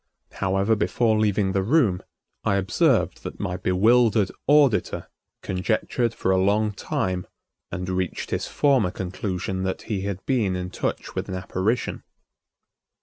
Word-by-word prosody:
However, 100 Hz, +3 st, +1 dB
before 110 Hz, +1 st, +1 dB
leaving 105 Hz, -2 st, +2 dB
the 95 Hz, 0 st, +1 dB
room, 110 Hz, -, +2 dB, 0.4 s
I 100 Hz, -, +2 dB
observed 95 Hz, -1 st, +2 dB
that -, -, -7 dB
my 90 Hz, -, -2 dB
bewildered 105 Hz, +3 st, +3 dB, 0.2 s
auditor 145 Hz, -6 st, +3 dB, 0.3 s
conjectured 110 Hz, +5 st, -1 dB
for 95 Hz, -, 0 dB
a 95 Hz, 0 st, +3 dB
long 105 Hz, +2 st, +2 dB
time 95 Hz, -2 st, -2 dB, 0.4 s
and 90 Hz, +1 st, -4 dB
reached 90 Hz, -1 st, -2 dB
his -, -, -1 dB
former 135 Hz, -10 st, +2 dB
conclusion 95 Hz, 0 st, -3 dB
that 95 Hz, 0 st, -3 dB
he 105 Hz, -4 st, -3 dB
had 100 Hz, -1 st, -4 dB
been 110 Hz, -9 st, +1 dB
in 90 Hz, 0 st, -4 dB
touch -, -, -3 dB
with -, -, -4 dB
an 95 Hz, -, -3 dB
apparition. 95 Hz, +5 st, -1 dB
100 Hz, 140 wpm, -24 LUFS, 95-110 Hz, 0.4 s, bewildered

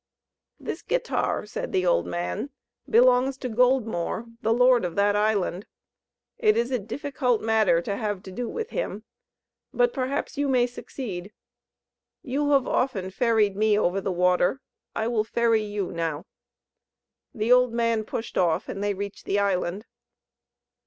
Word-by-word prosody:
"This -, -, -5 dB
guitar," -, -, -1 dB
said 210 Hz, -, -5 dB
the 185 Hz, -1 st, +1 dB
old 85 Hz, -, +2 dB
man, 90 Hz, -, -3 dB, 0.4 s
"belongs 250 Hz, +3 st, +4 dB
to 260 Hz, -, -4 dB
Goldmore, 235 Hz, -4 st, +1 dB, 0.2 s
the 225 Hz, -, +1 dB
lord 250 Hz, 0 st, +4 dB
of 175 Hz, -2 st, -3 dB
that 205 Hz, 0 st, +3 dB
island. 205 Hz, -3 st, 0 dB, 0.7 s
It 430 Hz, -2 st, +3 dB
is 240 Hz, +2 st, 0 dB
a 250 Hz, -, +1 dB
difficult 250 Hz, +2 st, -1 dB
matter 215 Hz, -6 st, +3 dB
to 200 Hz, -, -2 dB
have 205 Hz, -4 st, -3 dB
to 190 Hz, -, -9 dB
do 240 Hz, +5 st, -4 dB
with 450 Hz, -1 st, -5 dB
him; 220 Hz, -, -3 dB, 0.7 s
but -, -, +2 dB
perhaps 270 Hz, +2 st, -3 dB
you 285 Hz, -, +1 dB
may 255 Hz, -2 st, +3 dB
succeed. 210 Hz, -6 st, -7 dB, 0.9 s
You 285 Hz, +3 st, -1 dB
have 275 Hz, -3 st, +4 dB
often 195 Hz, -8 st, -1 dB
ferried 215 Hz, -2 st, +2 dB
me 215 Hz, 0 st, +3 dB
over 195 Hz, -1 st, +1 dB
the 195 Hz, -, -2 dB
water; 180 Hz, +6 st, +2 dB, 0.4 s
I 220 Hz, -, -1 dB
will 230 Hz, -3 st, +1 dB
ferry 230 Hz, 0 st, +2 dB
you 205 Hz, -2 st, -3 dB
now." 165 Hz, -2 st, -3 dB, 1.1 s
The 220 Hz, +1 st, 0 dB
old 250 Hz, -1 st, +5 dB
man 230 Hz, -1 st, +1 dB
pushed 225 Hz, +1 st, -4 dB
off, 170 Hz, -1 st, +1 dB
and 195 Hz, -, -5 dB
they 205 Hz, -1 st, 0 dB
reached 200 Hz, +1 st, -6 dB
the 200 Hz, -, 0 dB
island. 195 Hz, 0 st, 0 dB
220 Hz, 150 wpm, -25 LUFS, 195-250 Hz, 1.1 s, old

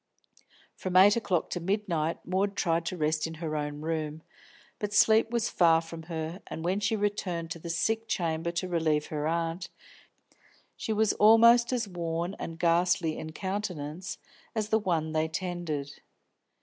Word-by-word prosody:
From 185 Hz, -1 st, -1 dB
eight 200 Hz, +2 st, +8 dB
o'clock 190 Hz, -7 st, -1 dB
to -, -, -2 dB
midnight 175 Hz, -4 st, -1 dB
Maud 195 Hz, +2 st, 0 dB
tried 165 Hz, -3 st, 0 dB
to 185 Hz, -, -3 dB
rest 155 Hz, 0 st, 0 dB
in 165 Hz, -, -7 dB
her 155 Hz, -1 st, -4 dB
own 150 Hz, 0 st, -3 dB
room, 155 Hz, -1 st, -3 dB, 0.6 s
but 210 Hz, 0 st, -3 dB
sleep 220 Hz, +1 st, +5 dB
was 235 Hz, -1 st, 0 dB
far 165 Hz, -2 st, +4 dB
from 165 Hz, 0 st, -8 dB
her, 165 Hz, +2 st, -4 dB
and 160 Hz, -, -6 dB
when 185 Hz, +3 st, +1 dB
she 210 Hz, +2 st, +1 dB
returned 185 Hz, -5 st, -2 dB
to 170 Hz, -, -4 dB
the 170 Hz, -, -7 dB
sick 225 Hz, +7 st, 0 dB
chamber 165 Hz, -3 st, -1 dB
to 175 Hz, +2 st, -2 dB
relieve 160 Hz, -4 st, +1 dB
her 150 Hz, 0 st, -1 dB
aunt, 165 Hz, +2 st, -2 dB, 1.1 s
she 225 Hz, -, -4 dB
was 215 Hz, -1 st, +2 dB
almost 235 Hz, +3 st, +6 dB
as 245 Hz, -4 st, -1 dB
worn 170 Hz, 0 st, -3 dB
and 165 Hz, -, -6 dB
ghastly 170 Hz, -1 st, +2 dB
in 160 Hz, -, -6 dB
countenance 180 Hz, -3 st, -4 dB, 0.4 s
as 215 Hz, -1 st, -1 dB
the 220 Hz, -, +3 dB
one 165 Hz, -6 st, -1 dB
they 155 Hz, 0 st, +1 dB
tended. 160 Hz, -4 st, -4 dB
170 Hz, 160 wpm, -29 LUFS, 160-200 Hz, 1.1 s, eight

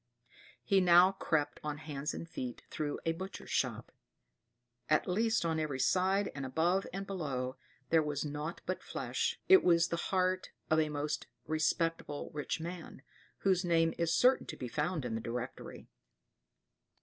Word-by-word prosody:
* 120 Hz, +1 st, -44 dB
temple -, -, -24 dB
He 195 Hz, -2 st, +4 dB
now 180 Hz, +1 st, +7 dB
crept 155 Hz, -6 st, -1 dB
on 150 Hz, -1 st, -3 dB
hands 150 Hz, -1 st, -4 dB
and 165 Hz, -, -6 dB
feet 125 Hz, -7 st, -6 dB
through 150 Hz, -2 st, -2 dB
a 165 Hz, -, +3 dB
butcher's 190 Hz, +4 st, -7 dB
shop; -, -, -1 dB, 1.0 s
at 155 Hz, -, +3 dB
least 220 Hz, +1 st, +1 dB
on 160 Hz, -1 st, 0 dB
every 150 Hz, -4 st, -2 dB
side, 190 Hz, +7 st, +2 dB
and 140 Hz, -, -5 dB
above 165 Hz, +8 st, +1 dB
and 195 Hz, +1 st, -4 dB
below, 140 Hz, -9 st, -3 dB, 0.4 s
there 165 Hz, -1 st, +6 dB
was 150 Hz, -1 st, -2 dB
nought 150 Hz, +3 st, -4 dB
but 185 Hz, 0 st, -2 dB
flesh. -, -, -2 dB
It 380 Hz, 0 st, +8 dB
was 170 Hz, -1 st, +4 dB
the 170 Hz, -, -1 dB
heart 185 Hz, 0 st, +1 dB, 0.2 s
of 160 Hz, -, +5 dB
a 155 Hz, -1 st, +2 dB
most 150 Hz, 0 st, -3 dB, 0.2 s
respectable 155 Hz, -1 st, -1 dB
rich 150 Hz, +2 st, -2 dB
man, 165 Hz, -5 st, -7 dB, 0.4 s
whose 190 Hz, -2 st, +3 dB
name 165 Hz, -2 st, +3 dB
is 170 Hz, -1 st, +1 dB
certain 255 Hz, +9 st, +4 dB
to -, -, -6 dB
be 125 Hz, -, -4 dB
found 150 Hz, +3 st, -1 dB
in 120 Hz, -, -3 dB
the 115 Hz, -, -2 dB
Directory. 120 Hz, +2 st, -6 dB
160 Hz, 165 wpm, -33 LUFS, 145-185 Hz, 1.0 s, It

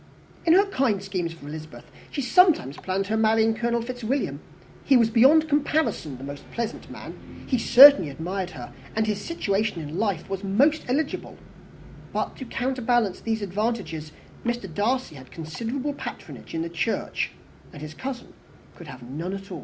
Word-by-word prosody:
In 325 Hz, -, +7 dB
her 390 Hz, +3 st, +6 dB
kind 260 Hz, -, 0 dB
schemes 185 Hz, -4 st, -3 dB
for 165 Hz, -3 st, -11 dB
Elizabeth, 155 Hz, +1 st, -9 dB, 0.2 s
she 280 Hz, -, -3 dB
sometimes 275 Hz, -, +4 dB
planned 190 Hz, +1 st, -2 dB
her 220 Hz, +1 st, 0 dB
marrying 220 Hz, 0 st, +3 dB
Colonel 235 Hz, +1 st, -1 dB
Fitzwilliam. 250 Hz, +2 st, -2 dB, 0.4 s
He 270 Hz, -, +5 dB
was, 230 Hz, -2 st, +3 dB
beyond 280 Hz, +7 st, +6 dB
comparison, 290 Hz, -, 0 dB
the 135 Hz, +2 st, -6 dB, 0.2 s
pleasantest 235 Hz, -1 st, -4 dB
man: -, -, -11 dB
he 255 Hz, -, 0 dB
certainly 250 Hz, -, +8 dB
admired 180 Hz, +6 st, -4 dB
her, -, -, -9 dB, 0.2 s
and 220 Hz, 0 st, +2 dB
his 210 Hz, -2 st, -1 dB
situation 210 Hz, -, -1 dB
in 155 Hz, +3 st, -5 dB
life 200 Hz, -7 st, -1 dB
was 195 Hz, 0 st, -4 dB
most 275 Hz, +11 st, +2 dB
eligible; 285 Hz, +4 st, -2 dB, 0.8 s
but, -, -, -2 dB
to 260 Hz, -, -7 dB
counterbalance 240 Hz, -6 st, 0 dB
these 225 Hz, -2 st, -2 dB
advantages, 195 Hz, -6 st, -3 dB, 0.3 s
Mr. 240 Hz, -2 st, -2 dB
Darcy 240 Hz, +3 st, 0 dB
had 130 Hz, -3 st, -12 dB
considerable 230 Hz, -, -4 dB
patronage -, -, -8 dB
in 165 Hz, -, -1 dB
the 170 Hz, -, -4 dB
church, 165 Hz, -2 st, -2 dB, 0.4 s
and 145 Hz, -, -10 dB
his 155 Hz, 0 st, -7 dB
cousin 260 Hz, +5 st, -6 dB, 0.4 s
could 170 Hz, -, -12 dB
have 130 Hz, -3 st, -10 dB
none 155 Hz, +9 st, -5 dB
at 195 Hz, 0 st, -9 dB
all. -, -, -5 dB
220 Hz, 160 wpm, -25 LUFS, 170-255 Hz, 0.8 s, certainly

